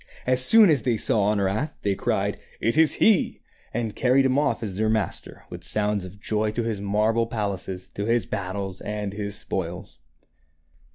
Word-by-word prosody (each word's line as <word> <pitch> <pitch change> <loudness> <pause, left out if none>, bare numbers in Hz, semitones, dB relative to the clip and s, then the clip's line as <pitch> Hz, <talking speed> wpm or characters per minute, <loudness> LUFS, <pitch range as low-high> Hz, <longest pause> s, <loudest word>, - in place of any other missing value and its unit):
As 125 0 +5
soon 215 - +8
as 145 - +2
they 120 -3 0
saw 105 -1 +4
Honorat, 105 +8 -1
they 100 - +1
cried, - - -2
" - - -25
It 115 - 0
is 160 0 +4
he! 215 -6 +2
" - - -33
and 115 -2 -3
carried 130 +1 +3
him 130 0 +2
off 145 -5 0
as 100 -4 -4
their 110 +1 +1
master 110 -5 -3
with - - -8
sounds 105 -2 -1
of 95 +2 -12
joy 105 +2 -1
to 120 - -2
his 110 -3 -3
marble 110 +3 +1
palaces, 95 -4 -4
to 100 - -4
his 115 +1 +1
battles, 95 0 -5
and 105 -1 -4
his 100 -1 -5
spoils. 90 -7 -5
105 Hz, 185 wpm, -24 LUFS, 100-120 Hz, -, soon